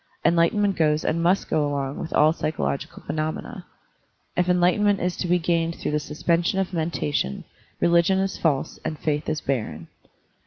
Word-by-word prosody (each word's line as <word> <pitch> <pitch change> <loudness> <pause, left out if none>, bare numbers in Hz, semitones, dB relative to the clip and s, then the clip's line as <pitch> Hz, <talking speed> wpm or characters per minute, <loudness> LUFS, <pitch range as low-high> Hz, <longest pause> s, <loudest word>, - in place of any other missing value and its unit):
Enlightenment 190 +4 +3
goes 155 -1 +1
and 165 - 0
must 180 +3 +2
go 155 - +1
along 140 -1 -2
with 165 - -5
all 155 +1 +4
psychological 70 - -3
phenomena. 155 0 -4 0.7
If 180 0 +1
enlightenment 180 +3 +3
is 180 0 -1
to 180 - -2
be 180 +1 +3
gained 170 -1 0
through - - -3
the 150 - +1
suspension 165 +4 0
of 190 -1 -1
mentation, 155 - -1 0.4
religion 170 +2 +3
is 190 0 0
false 145 -5 -1
and 155 - -3
faith 150 0 -1
is 155 -1 -2
barren. 85 - -3
165 Hz, 160 wpm, -24 LUFS, 150-180 Hz, 0.7 s, all